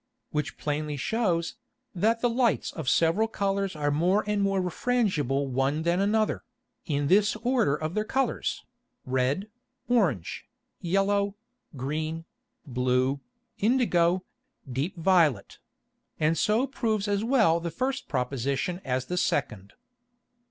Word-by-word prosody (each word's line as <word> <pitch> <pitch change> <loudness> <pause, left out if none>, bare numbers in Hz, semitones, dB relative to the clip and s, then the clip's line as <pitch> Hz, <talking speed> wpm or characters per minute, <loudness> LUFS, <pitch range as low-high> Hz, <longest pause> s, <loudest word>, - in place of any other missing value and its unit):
Which 150 0 -2
plainly 150 0 -2
shews, 175 - 0 0.4
that 225 +5 +1
the 245 - +3 0.2
Lights 235 - +1
of 160 -8 -3
several 170 +7 +3
Colours 195 -3 -1
are 145 -1 0
more 180 +8 +2
and 210 -1 0
more 195 -1 +1
refrangible 180 - 0
one 135 +4 0
than 170 +2 +1
another, 215 +2 +1 0.4
in 145 -3 0
this 205 +7 +4
Order 240 - +2
of 155 +2 -4
their 215 - 0
Colours, 265 +3 -1 0.4
red, 130 +9 0 0.4
orange, 175 - 0 0.3
yellow, 200 +3 +1 0.4
green, 155 +5 -3 0.4
blue, 130 +1 +1 0.4
indigo, 185 -7 +2 0.4
deep 135 +9 -3
violet; 165 - +2 0.6
and 155 +1 +2
so 215 - +2
proves 220 -6 -1
as 205 0 0
well 225 -9 +3
the 170 0 -3
first 260 - -2
Proposition 135 +6 -1
as 130 -1 -1
the 180 - -3
second. 105 - -1
170 Hz, 125 wpm, -27 LUFS, 145-210 Hz, 0.6 s, this